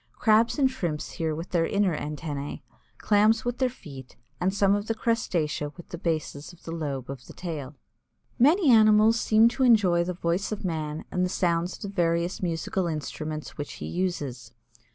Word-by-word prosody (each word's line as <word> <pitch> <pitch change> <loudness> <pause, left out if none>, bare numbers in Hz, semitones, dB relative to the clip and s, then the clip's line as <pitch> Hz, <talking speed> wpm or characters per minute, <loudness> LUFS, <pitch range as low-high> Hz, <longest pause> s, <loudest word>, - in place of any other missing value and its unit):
Crabs 225 +3 +3
and 275 -2 +4
Shrimps 175 -13 -3
hear 160 -3 -2
with 165 +3 -7
their 165 -2 +2
inner 200 -5 +1
antennæ, 150 -1 -5 0.3
Clams 215 +2 +3
with 245 0 -2
their 260 -1 +2
feet, 135 - -12 0.2
and 185 +2 +1
some 200 0 +3
of 205 +1 -1
the 225 - -1
crustacea 175 -11 -1
with 175 - -12
the 175 - -6
bases 155 -3 -3
of 175 - -19
the 165 - -7
lobe 145 -6 -4
of 135 -2 -8
the - - -11
tail. 150 -6 -6 0.6
Many 300 +4 +5
animals 215 0 +6
seem 220 +1 +5
to 255 - -5
enjoy 200 -8 +4
the 180 +1 -3
voice 175 +4 -1
of 215 -1 -4
man 155 -3 -3
and 180 - 0
the 180 - +1
sounds 175 -1 0
of - - -16
the 200 - -4
various 170 -2 0
musical 175 +1 -1
instruments 155 -1 -5
which 145 - -5
he - - -7
uses. 160 -9 -3
175 Hz, 185 wpm, -26 LUFS, 155-215 Hz, 0.6 s, animals